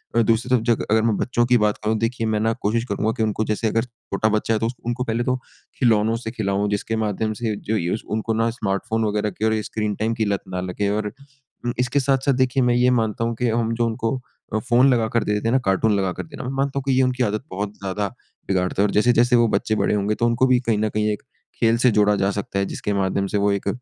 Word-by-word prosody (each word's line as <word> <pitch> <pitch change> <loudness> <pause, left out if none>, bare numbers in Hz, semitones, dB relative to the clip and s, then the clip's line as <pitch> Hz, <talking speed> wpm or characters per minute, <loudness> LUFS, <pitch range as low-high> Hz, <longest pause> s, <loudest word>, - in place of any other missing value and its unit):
अ, 115 - +5
दूसरी 115 +2 +1
तरफ़ 120 - +1
जग - - -5
अगर 110 0 +4
मैं 110 -1 +2
बच्चों 120 -1 +1
की 125 0 +4
बात 105 -2 +1
कहूँ 110 +1 +1
देखिए 115 0 -1
मैं 110 -1 +1
ना 115 +1 +1
कोशिश 115 +3 +1
करूँगा 110 +2 0
कि 110 - +1
उनको 110 0 0
जैसे 110 +1 -1
अगर 115 +1 +1
छोटा 115 -3 -3
बच्चा 110 +1 0
है 110 - +1
तो 115 - 0
उस 115 - -1
उनको 120 +1 -1
पहले 115 0 -1
तो 125 0 +1 0.4
खिलौनों 115 -3 +3
से 110 - -3
खिलाओ 105 -3 -1
जिसके 105 +2 -2
माध्यम 110 0 -1
से 110 -3 -1
जो 110 +2 -2
युस 90 +4 -2
उनको 110 +1 -1
ना 115 +1 +1
स्मार्टफ़ोन 110 0 -1
वगैरह 105 0 0
के 105 +3 -3
और 110 -1 +1
स्क्रीन 105 -1 -3
टाइम 110 +2 -1
की 115 -1 -1
लत 100 -1 -1
ना 90 -1 -3
लगे। 95 +2 -2
और 105 0 -1 0.7
इसके 125 +3 +1
साथ-साथ 135 0 +2
देखिए 130 0 +2
मैं 120 0 +3
ये 125 +1 +4
मानता 115 -2 0
हूँ 115 0 -1
कि 120 +2 -1
हम 115 0 0
जो 120 0 +1
उनको 115 +1 -1 0.4
अ, 110 - +2
फ़ोन 125 +4 +4
लगाकर 115 -1 +1
दे 105 - -1
देते 105 +2 -1
हैं 115 - +1
ना 130 - +4
कार्टून 95 +3 +2
लगाकर 95 -2 -2
देना। 155 -4 -9
मैं 125 - -3
मानता 140 0 0
हूँ - - -7
कि - - +3
ये - - +5
उनकी 125 0 +1
आदत 110 +1 -1
बहुत 100 +2 -3
ज़्यादा 100 +1 -2 0.4
बिगाड़ता 95 0 0
है - - +4
और - - -3
जैसे-जैसे 120 +3 +4
वो 120 -1 +4
बच्चे 110 - 0
बड़े 105 - +1
होंगे 105 +1 0
तो 120 - 0
उनको 120 +2 +3
भी 130 -1 +4
कहीं 110 -2 +2
न 110 0 +1
कहीं 105 0 0
एक 105 - -8 0.4
खेल 115 0 +3
से 125 - +6
जोड़ा 105 -1 +3
जा 100 0 +1
सकता 100 0 -3
है 100 - +1
जिसके 105 - -2
माध्यम 100 0 0
से - - +3
वो 100 0 +2
एक 100 -1 -2
110 Hz, 260 wpm, -22 LUFS, 105-120 Hz, 0.7 s, से